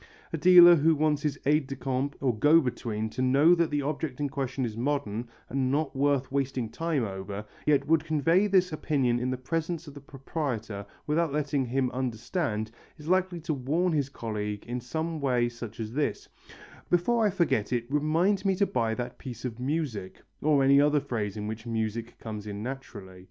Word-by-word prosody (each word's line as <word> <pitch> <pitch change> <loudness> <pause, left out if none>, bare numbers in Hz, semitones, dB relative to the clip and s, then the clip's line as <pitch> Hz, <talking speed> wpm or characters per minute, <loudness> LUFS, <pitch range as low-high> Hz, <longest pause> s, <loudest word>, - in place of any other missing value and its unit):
A - - 0
dealer 175 +1 +9
who 160 +2 +4
wants 150 -1 +1
his 150 -2 -1
aide 150 0 +3
de 135 - -5
camp 135 +2 -2
or 130 -4 +1
go 150 +9 +6
between 115 -6 -2
to 130 - -4
know 140 +6 +5
that 170 -2 +2
the 145 -1 -1
object 145 -2 -3
in 145 -1 -1
question 135 -1 -2
is 110 -2 -5
modern 120 -3 -2 0.2
and 130 0 0
not 145 0 -1
worth 140 -1 +1
wasting 135 -4 -1
time 160 0 -1
over, 100 0 -5 0.2
yet 140 -2 +3
would 160 +1 +3
convey 165 +5 +2
this 185 -3 +3
opinion 135 -6 +1
in 125 +1 -1
the 130 - -2
presence 165 +5 -3
of 145 - -10
the 145 - -11
proprietor 125 -7 -4 0.2
without 160 +1 +1
letting 145 -2 0
him 130 +1 0
understand, 120 - -2 0.3
is 150 -1 -11
likely 185 -1 +1
to 160 0 -2
warn 155 +7 0
his 140 -3 0
colleague 105 -5 -4
in 120 +1 -4
some 160 +6 -3
such - - -7
a - - -8
way 125 -3 +2 0.4
as 110 - -10
this, 145 +2 -2 0.6
"Before 225 +7 +2
I 210 - +4
forget 170 - 0
it, 120 -2 0
remind 160 +8 +1
me 195 -1 +2
to 200 - +2
buy 115 - 0
that 125 +1 -5
piece 125 -2 -7
of 120 -1 -5
music," 130 - -3 0.2
or 145 -2 +3
any 140 +1 +6
other 150 0 +3
phrase 110 -8 -3
in 105 - -4
which 110 +2 -6
music 115 0 -3
comes 105 -2 -7
in 100 0 -5
naturally. 110 -8 -7
135 Hz, 195 wpm, -28 LUFS, 120-155 Hz, 0.6 s, dealer